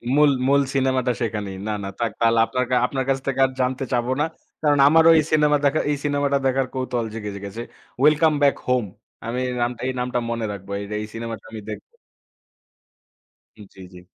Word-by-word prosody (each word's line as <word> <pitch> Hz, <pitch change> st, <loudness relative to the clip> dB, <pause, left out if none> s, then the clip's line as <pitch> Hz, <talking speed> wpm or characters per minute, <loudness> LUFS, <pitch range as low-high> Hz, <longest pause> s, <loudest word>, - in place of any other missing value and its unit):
মূল, 150 Hz, -1 st, +5 dB, 0.2 s
মূল 140 Hz, +1 st, +4 dB
সিনেমাটা 130 Hz, -2 st, +1 dB
সেখানেই। 105 Hz, -4 st, -3 dB
না, 110 Hz, -, -1 dB
না, 100 Hz, -, -4 dB
থাক 115 Hz, -1 st, 0 dB
তালে 115 Hz, 0 st, +4 dB
আপনা 125 Hz, -, -4 dB, 0.3 s
আপনার 130 Hz, -1 st, -3 dB
কাছ 135 Hz, 0 st, +1 dB
থেকে 135 Hz, -1 st, -1 dB
আর 130 Hz, -, -2 dB
জানতে 130 Hz, +2 st, -1 dB
চাবো 120 Hz, +1 st, 0 dB
না। -, -, +3 dB, 0.4 s
কারণ 145 Hz, -2 st, +3 dB
আমারও 160 Hz, +2 st, +6 dB
ওই 160 Hz, -, +5 dB
সিনেমা 150 Hz, -1 st, +4 dB
দেখা 145 Hz, +2 st, +3 dB
এই 145 Hz, -, 0 dB
সিনেমাটা 145 Hz, -1 st, +1 dB
দেখার 130 Hz, 0 st, +1 dB
কৌতূহল 125 Hz, -3 st, -2 dB
জেগে 105 Hz, -2 st, -5 dB
জে -, -, -6 dB
গেছে। 100 Hz, +4 st, -6 dB, 0.4 s
"ওয়েলকাম 155 Hz, +2 st, +4 dB
বাক 140 Hz, -1 st, +4 dB
হোম।" 125 Hz, -3 st, +2 dB, 0.4 s
আমি 120 Hz, +2 st, -3 dB
এই 125 Hz, -, -3 dB
নামটা, 120 Hz, 0 st, -2 dB
এই 130 Hz, -, -1 dB
নামটা 125 Hz, 0 st, -1 dB
মনে 115 Hz, -1 st, -2 dB
রাখবো। 100 Hz, -1 st, -9 dB
আর -, -, -2 dB, 0.2 s
এই -, -, -4 dB
সিনেমাটা 115 Hz, -2 st, -6 dB
আমি 110 Hz, -, -7 dB
দেখব। 105 Hz, -, -8 dB, 1.7 s
জি, 95 Hz, -, -20 dB
জি। 90 Hz, 0 st, -13 dB
125 Hz, 190 wpm, -22 LUFS, 115-140 Hz, 1.7 s, আমারও